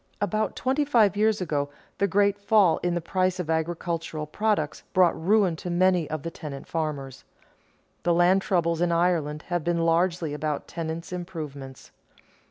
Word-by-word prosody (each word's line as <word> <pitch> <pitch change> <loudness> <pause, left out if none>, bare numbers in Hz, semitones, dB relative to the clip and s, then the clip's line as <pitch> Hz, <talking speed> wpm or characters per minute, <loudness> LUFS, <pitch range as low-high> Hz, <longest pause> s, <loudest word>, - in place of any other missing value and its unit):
About 215 +2 -1
twenty 270 +3 0
five 230 -9 +3
years 215 -1 +2
ago, 145 -5 -1 0.3
the 200 - +3
great 200 +1 +2
fall 200 -5 +4
in 175 -1 0
the 175 - -1
price 185 +2 0
of 165 -3 -2
agricultural 165 -1 -2
products 200 -2 -1
brought 180 -2 +4
ruin 195 -2 +3
to 180 - -6
many 180 -2 +2
of 155 -2 -4
the 165 - -4
tenant 145 -5 -8
farmers. 145 -5 -4 0.8
The 175 - +1
land 180 +3 +4
troubles 170 -3 0
in 175 -1 +2
Ireland 165 -3 +1
have 175 -2 -1
been 170 0 0
largely 170 -2 +1
about 150 0 -3
tenants' 165 +2 -5
improvements. 150 -7 -7
175 Hz, 160 wpm, -26 LUFS, 155-190 Hz, 0.8 s, fall